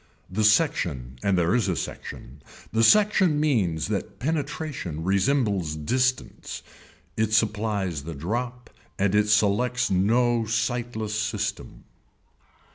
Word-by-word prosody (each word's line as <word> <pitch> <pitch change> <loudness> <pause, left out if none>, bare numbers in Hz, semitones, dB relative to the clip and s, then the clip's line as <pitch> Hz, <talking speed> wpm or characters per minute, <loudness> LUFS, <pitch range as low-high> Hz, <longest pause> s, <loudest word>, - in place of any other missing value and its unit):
The 110 +4 0
section 90 - +1
and 100 -2 +1
there 85 +2 +2
is 120 -5 +1
a 90 - 0
section, 70 -1 -7 0.3
the 110 - +2
section 190 - +4
means 95 - +1
that 100 -1 -3
penetration 145 - -3
resembles 100 - +1
distance, 125 +11 -2 0.5
it 110 0 0
supplies 105 -7 0
the 80 +1 -6
drop 120 - -4 0.3
and 100 -1 +1
it 105 0 +3
selects 115 +4 +2
no 115 +5 +2
sightless 115 -1 -2
system. 110 -1 -3
110 Hz, 115 wpm, -25 LUFS, 95-125 Hz, 0.5 s, section